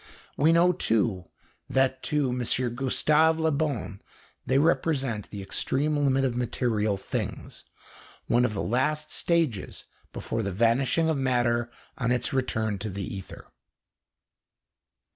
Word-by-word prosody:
We 155 +4 +4
know, 175 +2 +4
too, 110 - 0 0.4
that 130 0 +1
to 150 -3 +1
M. 125 - -2 0.3
Gustave 150 +5 +3
Le 160 0 +2
Bon 140 -9 -2 0.5
they 130 - +3
represent 135 - +1
the 100 -2 -7
extreme 145 +9 0
limit 135 -2 +2
of 125 -2 -1
material 110 -4 0
things, - - -5 0.6
one 120 +1 +2
of 110 -4 0
the - - -2
last 150 +6 0
stages 160 - -1 0.3
before 115 - -3
the 100 -2 -2
vanishing 120 - +2
of 160 -3 0
matter 120 -2 +1 0.3
on 125 -2 0
its 125 +1 0
return 110 -6 -1
to 110 +2 -4
the 100 0 -5
ether. 95 -1 -10
130 Hz, 130 wpm, -27 LUFS, 110-150 Hz, 0.6 s, We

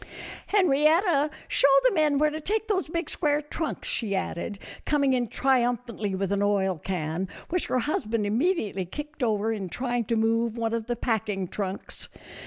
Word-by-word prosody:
" - - -11
Henrietta, 315 -3 +3 0.2
show - - +4 0.2
the - - +5
men 305 -4 +3
where 300 +1 +3
to 310 +1 -5
take 435 +6 -1
those 385 -5 0
big 335 +1 -2
square 295 -2 +1
trunks," 300 +1 -4
she 210 -4 -1
added, 190 +1 -3 0.3
coming 280 -3 +2
in 245 -2 +1
trium 245 0 +2
phantly 215 -5 -4
with 195 0 -1
an 200 0 +1
oil 195 -4 +1
can, 175 +1 -3 0.2
which 360 +1 0
her - - +1
husband 230 -5 -1
immedi 235 - +1
ately 185 -2 -4
kicked 300 0 -7
over 220 -2 +1
in 195 -4 -4
trying 245 +5 -1
to 230 +2 -1
move 230 +1 +1
one 230 -1 -1
of 230 -1 -2
the 240 - -1
packing 215 -5 -1
trunks. 195 +1 -5
235 Hz, 185 wpm, -26 LUFS, 205-300 Hz, 0.3 s, the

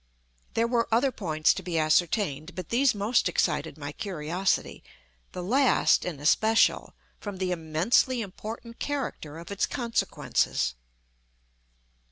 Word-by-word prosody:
There 230 - +3
were 235 -1 +1
other 250 +4 +3
points 155 -9 +1
to - - -5
be 175 -2 -3
ascertained, 155 0 +1
but 180 -1 -6
these 250 0 +3
most 205 0 +2
excited 165 - 0
my 145 -1 -6
curiosity—the 155 - -4
last 255 +7 +3
in 165 -6 -4
especial, 220 +9 +3 0.2
from 205 -2 -6
the 185 -1 -1
immensely 180 +10 +1
important 225 +3 -8
character 255 - -4
of 170 +4 -9
its 200 - 0
consequences. 235 -2 -1
190 Hz, 120 wpm, -27 LUFS, 155-230 Hz, 0.2 s, There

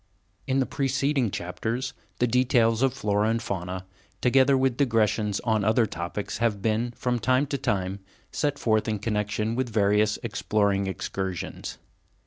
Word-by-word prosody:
In 135 0 +2
the 130 - +2
preceding 135 -2 0
chapters, 110 +9 -3 0.2
the 125 - +2
details 120 -2 +3
of 135 - +4
the 130 - -13
flora 105 -1 +1
and 115 +1 +1
fauna, 95 -3 -4 0.3
together 135 +2 +4
with 130 -2 +2
digressions 110 -5 +1
on 110 -3 +1
other 110 +3 +3
topics, 90 +1 -4
have 115 -3 +1
been, 110 +3 0
from 125 -1 -1
time 130 +4 +2
to 140 0 -2
time, 95 -2 -1 0.3
set 145 -1 -1
forth 110 -4 +1
in 110 -1 0
connection 105 +1 -1
with 125 0 -1
various 105 0 +2
exploring 100 -3 0
excursions. 95 -1 -4
110 Hz, 150 wpm, -26 LUFS, 105-125 Hz, 0.3 s, of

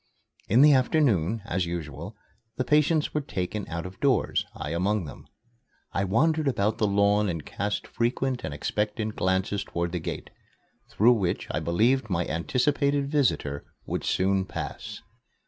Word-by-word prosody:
In 120 +7 +6
the 150 -1 +8
afternoon, 115 - +2
as 90 -2 -1
usual, 85 +3 -6 0.4
the 130 - +1
patients 150 +3 +2
were 150 - 0
taken 100 -4 -4
out 85 +1 -4
of 90 +1 -9
doors, 135 -4 +1
I 75 - -5
among 95 +3 0
them. 70 - -11 0.7
I 100 - 0
wandered 155 - +2
about 110 -4 0
the 105 - +3
lawn 100 +1 +3
and 80 -4 -4
cast 105 +1 -3
frequent 125 +2 -1
and 75 - -3
expectant 105 +8 -2
glances 95 +2 0
toward 85 0 -3
the 90 - -2
gate, - - -6 0.6
through 120 +4 +5
which 95 -7 -1
I - - -1
believed 115 +8 +2
my 90 -2 0
anticipated 140 - 0
visitor 120 - +1 0.2
would - - -3
soon 95 +1 +1
pass. - - -6
105 Hz, 150 wpm, -27 LUFS, 90-130 Hz, 0.7 s, the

